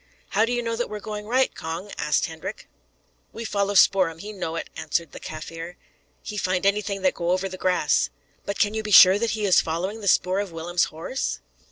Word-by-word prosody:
"How 215 Hz, +3 st, +3 dB
do 235 Hz, -, -3 dB
you 240 Hz, 0 st, 0 dB
know 230 Hz, 0 st, -2 dB
that 240 Hz, +1 st, -2 dB
we 210 Hz, -, -5 dB
are -, -, -8 dB
going 210 Hz, 0 st, -6 dB
right, 255 Hz, +3 st, +2 dB
Cong?" 165 Hz, +5 st, -6 dB
asked 150 Hz, 0 st, +1 dB
Hendrik. 160 Hz, -1 st, -7 dB, 0.6 s
"We 230 Hz, -, -7 dB
follow 200 Hz, -1 st, -1 dB
Spoor'em; 185 Hz, -4 st, +4 dB
he 210 Hz, +5 st, -8 dB
know 165 Hz, -5 st, -4 dB
it," 165 Hz, -, -5 dB
answered 165 Hz, -4 st, -2 dB
the -, -, -9 dB
Kaffir. 165 Hz, +2 st, -7 dB, 0.5 s
"He 210 Hz, -, -6 dB
find 185 Hz, -1 st, 0 dB
anything 200 Hz, -1 st, 0 dB
that 185 Hz, -, +3 dB
go 170 Hz, -1 st, -3 dB
over 185 Hz, +2 st, +1 dB
the 185 Hz, -, -7 dB
grass." 180 Hz, -4 st, +1 dB, 0.3 s
"But 200 Hz, -, -4 dB
can 210 Hz, 0 st, +2 dB
you 220 Hz, -, -1 dB
be 215 Hz, -, -6 dB
sure 190 Hz, 0 st, +9 dB
that 225 Hz, -1 st, -1 dB
he 210 Hz, -, -1 dB
is 190 Hz, -, +5 dB
following 185 Hz, +7 st, -3 dB
the 200 Hz, -, -5 dB
spoor 185 Hz, +1 st, +3 dB
of 200 Hz, -3 st, -3 dB
Willem's 170 Hz, +2 st, 0 dB
horse?" 165 Hz, +12 st, -4 dB
195 Hz, 220 wpm, -24 LUFS, 170-210 Hz, 0.6 s, sure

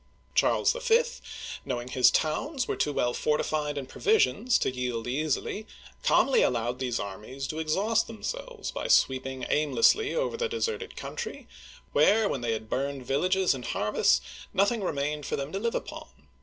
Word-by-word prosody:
Charles -, -, +3 dB
V., -, -, +3 dB, 0.6 s
knowing 120 Hz, 0 st, -3 dB
his 125 Hz, 0 st, +5 dB
towns 255 Hz, -, 0 dB
were -, -, -1 dB
too 150 Hz, -, 0 dB
well 120 Hz, -3 st, 0 dB
fortified 150 Hz, 0 st, 0 dB
and 135 Hz, -2 st, -4 dB
provisioned 255 Hz, -, +1 dB
to 235 Hz, -, +3 dB
yield 125 Hz, -2 st, -2 dB
easily, 155 Hz, -, -2 dB, 0.3 s
calmly 275 Hz, -, +4 dB
allowed 120 Hz, 0 st, 0 dB
these 125 Hz, -2 st, -1 dB
armies 105 Hz, +7 st, -6 dB
to 155 Hz, +3 st, -4 dB
exhaust 200 Hz, +8 st, +1 dB
themselves 485 Hz, -, -5 dB
by -, -, -4 dB
sweeping 130 Hz, 0 st, +2 dB
aimlessly 150 Hz, -, +3 dB
over 485 Hz, -1 st, -1 dB
the 470 Hz, 0 st, -1 dB
de 460 Hz, -, -3 dB
serted 455 Hz, 0 st, -3 dB
country, 470 Hz, -2 st, -6 dB, 0.5 s
where, 215 Hz, +1 st, +4 dB
when 135 Hz, -, -2 dB
they 115 Hz, -1 st, 0 dB
had 110 Hz, 0 st, -5 dB
burned 135 Hz, +1 st, -2 dB
villages 185 Hz, +8 st, +2 dB
and 125 Hz, -3 st, -7 dB
harvests, 105 Hz, 0 st, +2 dB, 0.3 s
nothing 200 Hz, +4 st, +2 dB
remained 150 Hz, -2 st, -2 dB
for -, -, -1 dB
them 140 Hz, +1 st, -4 dB
to 195 Hz, -, -2 dB
live 230 Hz, +2 st, -1 dB
upon. -, -, -5 dB
150 Hz, 160 wpm, -28 LUFS, -, 0.6 s, his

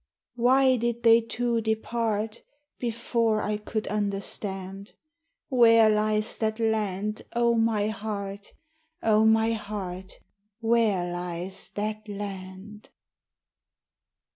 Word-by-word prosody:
Why 255 Hz, +2 st, +4 dB
did 235 Hz, 0 st, -2 dB
they 230 Hz, 0 st, +7 dB
two 235 Hz, 0 st, -1 dB
depart 220 Hz, 0 st, -2 dB, 0.4 s
Before 230 Hz, -2 st, 0 dB
I 210 Hz, 0 st, -1 dB
could 215 Hz, +1 st, -4 dB
understand? 195 Hz, -1 st, -3 dB, 0.6 s
Where 230 Hz, -4 st, +6 dB
lies 215 Hz, +1 st, +1 dB
that 220 Hz, 0 st, -1 dB
land, 215 Hz, -2 st, -1 dB
O 235 Hz, 0 st, +3 dB
my 225 Hz, -2 st, +1 dB
heart? 200 Hz, -2 st, -5 dB, 0.5 s
O 220 Hz, 0 st, +4 dB
my 220 Hz, +1 st, +4 dB
heart, 195 Hz, -4 st, -5 dB, 0.5 s
where 220 Hz, -6 st, +1 dB
lies 180 Hz, +2 st, -4 dB
that 215 Hz, +1 st, -3 dB
land? 200 Hz, +1 st, -8 dB
215 Hz, 95 wpm, -26 LUFS, 200-230 Hz, 0.6 s, they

